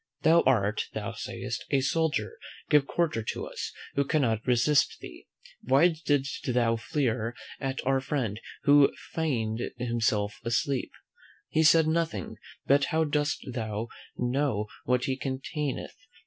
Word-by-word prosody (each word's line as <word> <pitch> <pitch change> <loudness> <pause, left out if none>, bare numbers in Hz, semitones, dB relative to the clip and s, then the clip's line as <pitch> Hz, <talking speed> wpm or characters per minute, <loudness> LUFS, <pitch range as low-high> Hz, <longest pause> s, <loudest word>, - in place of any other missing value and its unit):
Thou 165 +2 +6
art, 105 -5 +2
thou - - -3
sayest, - - -5
a 140 - +3
soldier; 160 - 0 0.3
give 145 -2 +5
quarter 165 -9 0
to 110 - -4
us, - - -5 0.2
who 140 - +2
cannot 130 -7 0
resist 130 +4 +3
thee. - - -11 0.3
Why 140 +7 +5
didst 145 -5 -1
thou 115 -2 +3
fleer 115 -1 -1 0.2
at 135 0 -3
our 135 0 +3
friend, 120 -7 -2 0.2
who 145 -1 +6 0.2
feigned 120 -8 -1 0.2
himself 110 -4 0
asleep? 125 +3 0 0.6
He 160 - +2
said 160 0 +6
nothing; 160 - -1 0.3
but 140 0 +4
how 160 +3 +1
dost 150 0 -1
thou 110 -1 -3 0.3
know 125 -3 0 0.2
what 125 0 +2
he 130 - 0
containeth? 135 +2 -4
135 Hz, 135 wpm, -28 LUFS, 115-150 Hz, 0.6 s, Thou